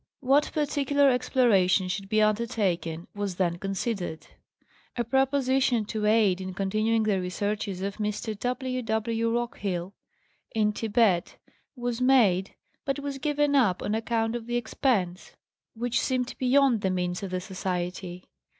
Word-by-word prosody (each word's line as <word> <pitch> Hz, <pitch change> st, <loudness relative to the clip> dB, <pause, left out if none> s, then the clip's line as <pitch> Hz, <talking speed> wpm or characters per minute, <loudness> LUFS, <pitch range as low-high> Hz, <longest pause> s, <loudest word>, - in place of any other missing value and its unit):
What 275 Hz, +3 st, +3 dB
par 305 Hz, -, 0 dB
ticular 285 Hz, -1 st, +2 dB
exploration 210 Hz, -7 st, +3 dB
should 195 Hz, +1 st, -4 dB
be 215 Hz, 0 st, +3 dB
undertaken 205 Hz, -7 st, 0 dB
was 205 Hz, -3 st, -3 dB
then 175 Hz, -2 st, 0 dB
considered. 195 Hz, -3 st, -3 dB, 0.7 s
A 240 Hz, -, +1 dB
proposition 265 Hz, -2 st, +2 dB
to 210 Hz, 0 st, -2 dB
aid 210 Hz, -4 st, +3 dB
in 185 Hz, 0 st, -6 dB
continuing 215 Hz, +4 st, +1 dB
the 205 Hz, -3 st, +1 dB
researches 195 Hz, +1 st, -3 dB
of 200 Hz, 0 st, -3 dB
Mr. 210 Hz, +1 st, -3 dB
W. 255 Hz, +1 st, -2 dB
W. 230 Hz, +1 st, 0 dB
Rockhill, 200 Hz, -6 st, -3 dB, 0.6 s
m 210 Hz, -1 st, +2 dB
Thibet, 210 Hz, -5 st, +1 dB, 0.4 s
was 245 Hz, -1 st, -3 dB
made 220 Hz, -8 st, +3 dB, 0.3 s
but 275 Hz, 0 st, -1 dB
was 285 Hz, -1 st, -5 dB
given 295 Hz, 0 st, +1 dB
up 215 Hz, -10 st, +3 dB
on 205 Hz, -, -1 dB
account 225 Hz, 0 st, 0 dB
of 235 Hz, -1 st, -5 dB
the 240 Hz, 0 st, 0 dB
expense, 220 Hz, -6 st, -1 dB, 0.4 s
which 240 Hz, +1 st, 0 dB
seemed 255 Hz, -1 st, -1 dB
beyond 260 Hz, -3 st, +3 dB
the 190 Hz, -, +1 dB
means 180 Hz, -1 st, -2 dB
of 195 Hz, -, -4 dB
the 185 Hz, 0 st, -2 dB
Society. 180 Hz, -1 st, -4 dB
220 Hz, 140 wpm, -27 LUFS, 190-250 Hz, 0.7 s, What